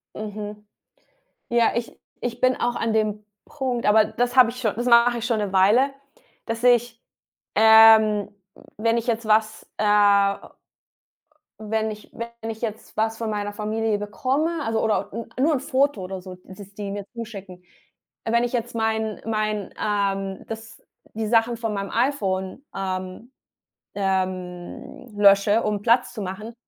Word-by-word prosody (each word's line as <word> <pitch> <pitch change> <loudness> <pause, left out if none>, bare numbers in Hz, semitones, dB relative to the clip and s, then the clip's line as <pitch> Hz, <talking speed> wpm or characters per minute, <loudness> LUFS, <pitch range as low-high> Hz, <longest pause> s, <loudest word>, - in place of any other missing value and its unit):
Mhm. 210 0 -7 0.8
Ja, 235 -1 +3
ich 235 0 -4 0.2
ich 245 -1 -4
bin 255 0 +3
auch 240 0 -1
an 225 - -1
dem 215 -1 0 0.2
Punkt, 260 -5 -3
aber 215 +1 +6
das 245 +3 -2
habe 245 -3 +7
ich 250 - -9
schon 215 -4 -1
das 240 +2 -3
mache 235 0 +5
ich 230 - -3
schon 230 -2 0
'ne 205 -2 -2
Weile, 215 +9 +4 0.5
dass 230 +1 -4
ich, 240 -1 +2 0.5
ähm, 220 -1 +7 0.3
w - - -18 0.2
wenn 230 +1 +1
ich 230 - -4
jetzt 230 -1 -1
was, 215 0 +1
äh 215 - 0 1.8
wenn 220 0 -1
ich 215 0 -10
wenn 235 -1 -6
ich 220 +1 -10
jetzt 220 -2 -6
was 220 +1 0
von 225 -2 -3
meiner 205 -1 -3
Familie 215 +1 -1
bekomme, 270 +10 -1
also 225 -3 -1
oder 210 -2 0
n 230 +3 -6 0.2
nur 315 +1 +3
'n - - -1
Foto 275 -3 0
oder 185 0 -6
so, 185 0 -9
dass 195 +1 -12
die 200 -1 -5
mir 205 0 -5
zuschicken, 200 -6 -8 0.6
äh 225 - -2
wenn 235 0 +3
ich 245 - -2
jetzt 240 -1 -3
mein 220 -1 -1
mein, 215 -2 -2
ähm, 195 -2 -2
das 225 0 -9 0.3
die 220 0 -2
Sachen 230 +1 +2
von 225 -2 -3
meinem 200 -1 -4
iPhone, 210 -4 -1
ähm 185 +5 -5 0.6
ähm, 185 +3 -4
lösche, 205 +2 +5
um 210 -1 -1
Platz 240 +4 +2
zu 220 - -6
machen, 200 +4 -6
220 Hz, 160 wpm, -23 LUFS, 205-235 Hz, 1.8 s, habe